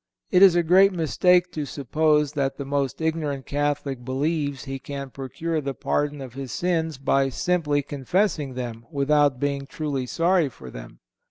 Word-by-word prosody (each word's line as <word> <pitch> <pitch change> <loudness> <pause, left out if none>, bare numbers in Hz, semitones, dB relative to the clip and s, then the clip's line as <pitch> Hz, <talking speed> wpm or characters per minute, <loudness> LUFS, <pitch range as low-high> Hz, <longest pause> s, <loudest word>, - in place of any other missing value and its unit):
It 185 - +5
is 190 -3 +8
a 175 - +3
great 190 +4 +6
mistake 180 +2 +3
to 155 - -3
suppose 150 +2 +1
that 135 -2 -1
the 140 - -5
most 140 +1 -2
ignorant 155 -4 -2
Catholic 145 -3 -2
believes 140 +2 -1
he 135 -1 -5
can 140 0 -7
procure 155 +5 -3
the 140 -1 -4
pardon 145 -1 -1
of 130 -3 -8
his 135 -1 -6
sins 165 -4 -1
by 135 0 +2
simply 150 -1 0
confessing 145 0 -1
them 115 -2 -6
without 145 -1 +2
being 140 0 -2
truly 140 -4 -3
sorry 170 +1 +2
for 65 - -12
them. - - -11
145 Hz, 165 wpm, -24 LUFS, 135-160 Hz, -, is